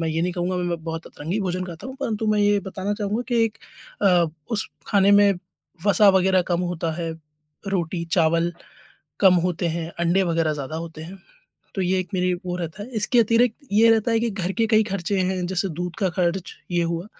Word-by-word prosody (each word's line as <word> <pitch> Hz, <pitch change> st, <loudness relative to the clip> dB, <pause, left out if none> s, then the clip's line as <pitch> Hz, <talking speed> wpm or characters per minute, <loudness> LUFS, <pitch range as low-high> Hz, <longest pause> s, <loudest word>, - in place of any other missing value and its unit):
मैं 165 Hz, -, -1 dB
ये 160 Hz, +1 st, -1 dB
नहीं 180 Hz, +1 st, 0 dB
कहूँगा 180 Hz, +1 st, -2 dB
मैं 180 Hz, -, -1 dB
मैं 170 Hz, -2 st, -3 dB
बहुत 165 Hz, 0 st, -5 dB
अतरंगी 170 Hz, +8 st, -4 dB
भोजन 185 Hz, -1 st, -2 dB
खाता 175 Hz, +5 st, -8 dB
हूँ, 260 Hz, -, -7 dB
परंतु 225 Hz, -5 st, -2 dB
मैं 210 Hz, -, +1 dB
ये 205 Hz, 0 st, +4 dB
बताना 190 Hz, +1 st, -3 dB
चाहूँगा 210 Hz, +3 st, -2 dB
कि 235 Hz, -2 st, +2 dB
एक 225 Hz, -1 st, -3 dB, 0.5 s
अ, 180 Hz, -4 st, +5 dB, 0.2 s
उस 220 Hz, -2 st, 0 dB, 0.2 s
खाने 200 Hz, -1 st, +4 dB
में 205 Hz, 0 st, +6 dB, 0.5 s
वसा 205 Hz, 0 st, +6 dB
वग़ैरह 190 Hz, 0 st, +3 dB
कम 170 Hz, -, +1 dB
होता 165 Hz, -1 st, -2 dB
है, 165 Hz, -2 st, -3 dB, 0.6 s
रोटी, 175 Hz, -3 st, -1 dB
चावल 170 Hz, 0 st, +2 dB, 0.7 s
कम 190 Hz, -2 st, +7 dB
होते 180 Hz, 0 st, -1 dB
हैं, 165 Hz, -1 st, -4 dB
अंडे 170 Hz, +3 st, +3 dB
वग़ैरह 165 Hz, -2 st, +1 dB
ज़्यादा 145 Hz, +1 st, -5 dB
होते 160 Hz, -1 st, -7 dB
हैं, 185 Hz, +4 st, -9 dB, 0.6 s
तो 195 Hz, -, -1 dB
ये 185 Hz, +1 st, +1 dB
एक 185 Hz, -, -6 dB
मेरी 180 Hz, 0 st, +1 dB
वो 180 Hz, 0 st, -2 dB
रहता 175 Hz, +3 st, -5 dB
है। -, -, -11 dB
इसके 240 Hz, +4 st, +2 dB
अतिरिक्त 230 Hz, +1 st, +3 dB, 0.2 s
ये 225 Hz, +2 st, +6 dB
रहता 225 Hz, +1 st, +3 dB
है 225 Hz, -, +2 dB
कि 235 Hz, 0 st, 0 dB
घर 190 Hz, -2 st, -3 dB
के 225 Hz, +2 st, +1 dB
कई 215 Hz, 0 st, +5 dB
खर्चे 195 Hz, 0 st, -2 dB
हैं, 185 Hz, 0 st, 0 dB
जैसे 190 Hz, +1 st, -1 dB
दूध 180 Hz, -1 st, -4 dB
का 195 Hz, -4 st, +1 dB
खर्च, 180 Hz, 0 st, -1 dB, 0.2 s
ये 175 Hz, -1 st, +1 dB
हुआ, 170 Hz, +2 st, -2 dB
185 Hz, 215 wpm, -23 LUFS, 170-205 Hz, 0.7 s, कम